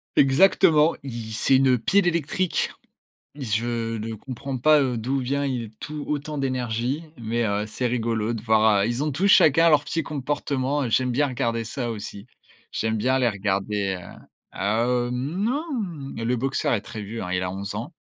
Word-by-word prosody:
Exactement, 160 +2 +5
il 115 -4 -6
c'est 130 +5 +3
une 130 -2 +4
pile 190 - +2
électrique. 170 +2 0 0.6
Je 115 -2 -2
ne 110 +1 -4
comprends 130 +4 -6
pas, 150 +4 +5
heu, 130 -3 0
d'où 130 +5 -1
vient 140 +3 -1
il 125 -5 -3
tout 150 -1 -6
autant 150 0 -3
d'énergie, 130 +2 -1
mais, 115 +1 -1
heu, 105 0 0
c'est 115 +4 -3
rigolo 115 -1 -1
de 115 - -5
voir, 110 -2 +4
heu - - +1
ils 120 +4 -1
ont 150 - -1
tous 180 +9 +1
chacun 165 -3 +6
leur 150 -1 +4
petit 165 +3 -1
comportement, 140 -1 -2
heu, 120 - -2
j'aime 125 +2 +2
bien 145 +4 +2
regarder 115 -3 -1
ça 120 +2 -4
aussi. 100 -2 -7 0.5
J'aime 110 0 -1
bien 130 +4 +1
les 120 -2 +3
regarder, 100 -1 -1
heu - - -12 0.3
ah, 110 +4 0
heu, 125 0 0
non, 190 - -1 0.5
le 115 +2 0
Boxer 130 +2 -1
est 110 - 0
très 110 -1 -8
vieux, 110 +3 -6
hein, 90 - -5
il 90 0 0
a 90 - -2
11 95 +1 -4
ans - - -5
125 Hz, 185 wpm, -24 LUFS, 110-140 Hz, 0.6 s, chacun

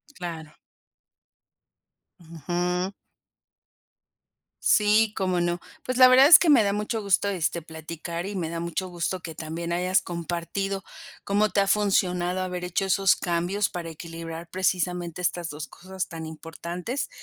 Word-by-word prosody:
Claro. 160 -3 -7 1.6
Ujú. 175 +3 -2 1.7
Sí, 215 0 +4
cómo 185 -2 0
no, 175 0 -1 0.2
pues 255 0 -2
la 255 -1 +9
verdad 260 +2 +8
es 305 0 +11
que 340 - +2
me 275 -7 +7
da 200 0 +1
mucho 210 +2 -2
gusto, 200 0 +2
este, 170 -3 -1
platicar 165 +2 -6
y 200 0 -5
me 165 -3 -2
da 165 0 -4
mucho 170 +2 -3
gusto 175 +1 -3
que 165 - -7
también 165 +2 -5
hayas 180 +2 +2
compartido 175 +3 -3 0.4
cómo 205 +2 +2
te 200 - +2
ha 195 - +1
funcionado 185 -3 +1
haber 180 -1 -3
hecho 180 +2 -1
esos 195 0 +3
cambios 175 +4 -1
para 170 -2 -5
equilibrar 165 +1 -8
precisamente 180 -2 -1
estas 175 -1 -1
2 150 +1 -6
cosas 185 +1 -6
tan 165 -1 -6
importantes 170 - -5
180 Hz, 145 wpm, -26 LUFS, 170-195 Hz, 1.7 s, es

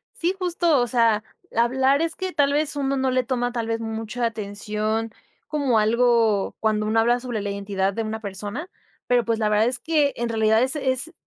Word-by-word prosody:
Sí, 350 +2 0
justo, 345 -4 +2
o 245 - 0
sea, 230 -3 +2 0.3
hablar 265 +5 +3
es 330 0 -1
que 375 -1 -4
tal 280 -1 +2
vez 300 +1 0
uno 275 -1 -1
no 265 0 +1
le 255 0 +2
toma, 245 0 -1
tal 235 -2 -3
vez 230 0 -1
mucha 225 +1 -3
atención, 215 +1 -3 0.4
como 280 -6 +1
algo 225 -2 +2
cuando 215 -1 0
uno 220 +1 +2
habla 240 +2 +3
sobre 240 -4 -4
la 200 0 -3
identidad 200 -1 -1
de 225 - -2
una 220 0 -4
persona. 205 - -6 0.4
Pero 245 -1 +2
pues, 230 0 0
la 215 -1 +1
verdad 210 +2 +3
es 245 0 0
que 300 -4 +1
en 235 0 -2
realidad 220 0 +3
es 265 +4 0
es 270 +2 -1
235 Hz, 200 wpm, -23 LUFS, 220-265 Hz, 0.4 s, hablar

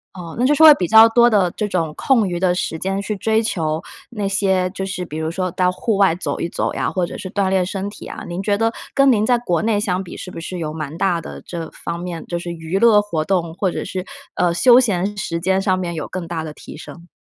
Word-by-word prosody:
哦， 170 -3 -8
那 245 - +1
就 285 - +4
是 - - 0
说 320 - +9
会 305 - +11
比 180 -8 -2
较 220 +3 +8
多 235 +1 +5
的 200 -6 +3
这 210 - -2
种 165 -5 -1
空 235 -7 +2
余 175 -1 -3
的 180 -1 +2
时 175 -2 -2
间 195 +3 -2
去 210 +1 -3
追 220 +2 +1
求 160 -7 -2 0.3
那 210 -5 -3
些 190 -2 +1
就 190 0 -4
是 185 -2 -4
比 155 -2 -7
如 160 0 -2
说 185 +1 -2
到 180 +1 +1
户 220 +4 -1
外 195 -3 +4
走 180 - -3
一 170 - -2
走 - - -2
呀， - - -1
或 180 -2 0
者 - - -8
是 185 - -7
锻 200 -2 0
炼 190 -1 +2
身 195 +1 -4
体 205 - -11
啊。 - - -8
您 175 +3 -4
觉 205 0 +1
得 225 +1 +1 0.2
跟 275 0 +4
您 215 -4 +3
在 245 +1 +3
国 180 -9 -1
内 220 0 +1
相 190 -2 -1
比 175 - -10
是 - - -7
不 - - -10
是 180 +2 -6
有 155 -3 -4
蛮 155 0 -6
大 175 -2 +1
的 - - -9
这 165 -2 -6
方 170 - -5
面 175 -2 -6
就 175 - -3
是 175 0 -5
娱 165 +2 -3
乐 215 -1 +5
活 170 -7 -2
动， 170 -2 -1
或 190 +1 -1
者 - - -4
是， 185 -1 -5 0.3
呃， 175 -1 +1
休 240 +8 +6
闲 205 -3 -1
时 170 -4 -3
间 190 +2 +1
上 185 -2 +1
面 175 -2 -3
有 155 - -4
更 180 -2 -5
大 165 -1 -4
的 155 - -6
提 - - -11
升？ 170 +2 -11
185 Hz, 295 characters per minute, -20 LUFS, 170-205 Hz, 0.3 s, 会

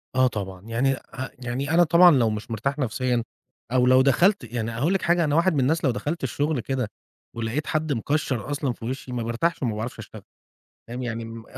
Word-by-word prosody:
آه 130 0 +5
طبعًا. 95 -5 -5
يعني 125 +4 +1
أ 130 0 -8
يعني 130 +4 -3
أنا 175 +1 +6
طبعًا 175 +2 +7
لو 120 -7 +3
مش 105 +1 -5
مرتاح 135 +6 -2
نفسيًا، 125 -1 0 0.5
أو 125 -1 +3
لو 130 +1 +6
دخَلت 175 - +3
يعني 115 -1 -2
هاقول 140 +11 0
لِك 195 - +1
حاجة 170 0 +2
أنا 150 -1 +1
واحد 170 +1 +3
من 140 - +1
الناس 160 +6 +1
لو 130 - +3
دخَلت 145 +10 -3
الشغل 145 -2 0
كده 125 -2 -2 0.4
ولقيت 115 +6 -2
حد 155 -2 0
مكشَّر 135 +1 -1
أصلًا 140 -4 -1
في 115 - -10
وشي 130 +1 -5
ما 120 -2 -2
بارتاحش 120 +9 -1
وما 115 -4 0
باعرفش 110 +3 -5
أشتغل، - - -10 0.7
فاهم 125 +2 -5
يعني 115 -1 -4
م 115 0 -9
130 Hz, 205 wpm, -24 LUFS, 115-150 Hz, 0.7 s, طبعًا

